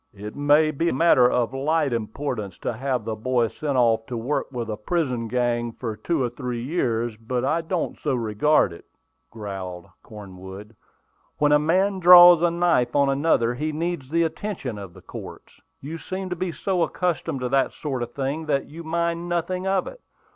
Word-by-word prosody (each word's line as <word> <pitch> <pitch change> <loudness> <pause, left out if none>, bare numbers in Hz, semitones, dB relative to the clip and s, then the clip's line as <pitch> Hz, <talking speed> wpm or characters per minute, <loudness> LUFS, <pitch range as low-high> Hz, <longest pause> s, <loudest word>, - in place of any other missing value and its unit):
"It 105 +2 -8
may 145 +2 +4
be 165 +3 0
a - - -1
matter 130 -5 +5
of 125 0 0
light 145 0 0
importance 110 -3 -4
to - - -1
have 125 -1 -2
the 110 -1 -3
boy 120 +1 0
sent 145 +1 -3
off 115 -2 +2
to 120 - -4
work 130 +5 -2
with 120 -3 -4
a 110 - -3
prison 125 -1 -2
gang 120 -1 -1
for 115 -3 -5
two 140 +7 -1
or 120 - 0
three 125 -1 -4
years, 120 -6 -1
but 120 +3 -2
I 160 +5 +1
don't 165 +1 -3
so 130 - -1
regard 115 - +2
it," 85 - -13 0.4
growled 95 -5 -7 0.2
Cornwood. 100 +1 -11 0.6
"When 150 0 +3
a 150 - +6
man 190 +6 +1
draws 175 -1 +9
a 175 - +4
knife 170 -8 +1
on 140 -1 +4
another, 135 -4 +2
he 150 +5 -2
needs 160 -3 -3
the 170 +2 +2
attention 160 - -4
of 95 -3 -10
the - - -14
courts. - - -11 0.2
You 160 +4 -6
seem 185 +1 -5
to - - -1
be 180 0 -3
so 185 +2 -1
accustomed 165 -5 -1
to 125 - -2
that 135 +1 +2
sort 135 -5 -4
of 120 0 -4
thing 140 +4 -3
that 140 -2 0
you 165 +3 -10
mind 170 +1 -2
nothing 180 +2 -2
about 190 -1 +1
it. - - -20
135 Hz, 190 wpm, -24 LUFS, 115-165 Hz, 0.6 s, draws